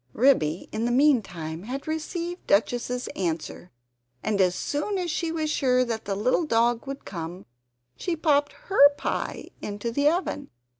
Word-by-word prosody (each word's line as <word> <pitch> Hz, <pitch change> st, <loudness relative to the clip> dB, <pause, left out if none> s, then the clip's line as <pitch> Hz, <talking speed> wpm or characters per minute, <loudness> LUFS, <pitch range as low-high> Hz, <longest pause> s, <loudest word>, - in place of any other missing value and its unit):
Ribby 190 Hz, -, +3 dB
in 220 Hz, +2 st, -1 dB
the 240 Hz, -, +1 dB
meantime 195 Hz, -, +2 dB
had 260 Hz, +8 st, -6 dB
received 335 Hz, +3 st, -4 dB
Duchess's 245 Hz, +4 st, +1 dB
answer, 170 Hz, -1 st, -4 dB, 0.5 s
and 210 Hz, -2 st, +1 dB
as 180 Hz, -1 st, +3 dB
soon 300 Hz, +8 st, -2 dB
as 355 Hz, -3 st, -1 dB
she 330 Hz, +1 st, -1 dB
was 310 Hz, -2 st, -1 dB
sure 255 Hz, -3 st, +3 dB
that 225 Hz, -2 st, -3 dB
the 200 Hz, -, -1 dB
little 255 Hz, -, +1 dB
dog 235 Hz, 0 st, +2 dB
would 275 Hz, 0 st, -6 dB
come 175 Hz, -1 st, -6 dB, 0.5 s
she 350 Hz, -, -2 dB
popped 290 Hz, -3 st, +2 dB
HER 385 Hz, -, +5 dB
pie -, -, -3 dB
into 205 Hz, +3 st, -4 dB
the 285 Hz, +5 st, +3 dB
oven. 330 Hz, -4 st, -2 dB
250 Hz, 155 wpm, -26 LUFS, 200-300 Hz, 0.5 s, HER